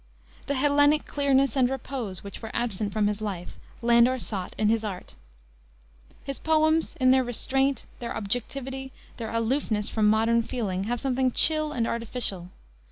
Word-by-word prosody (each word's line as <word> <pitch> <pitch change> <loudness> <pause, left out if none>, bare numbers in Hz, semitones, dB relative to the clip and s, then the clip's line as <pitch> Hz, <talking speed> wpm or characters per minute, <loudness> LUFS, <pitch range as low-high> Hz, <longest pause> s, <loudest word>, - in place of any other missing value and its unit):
The 285 - 0
Hellenic 290 +2 +3
clearness 275 -3 +2
and 255 -2 +3
repose 255 -7 -5
which 200 - -9
were 225 - -6
absent 215 -4 -1
from 210 +1 +1
his 210 +1 -1
life, 190 -5 -5 0.2
Landor 235 +2 +4
sought 195 -6 -4
in 215 - +2
his 225 +1 +2
art. 195 -4 -6 1.1
His 275 0 -5
poems, 315 0 +2
in 255 -2 +4
their 260 0 +4
restraint, 265 +2 0
their 235 -2 -4
objectivity, 265 +5 -4 0.3
their 225 -2 -5
aloofness 230 -2 0
from 215 -2 +1
modern 225 +2 +3
feeling, 200 -5 -3
have 240 +2 -2
something 260 0 +1
chill 310 +3 +4
and 240 -5 -1
artificial. 230 -6 -2
240 Hz, 155 wpm, -26 LUFS, 215-270 Hz, 1.1 s, Landor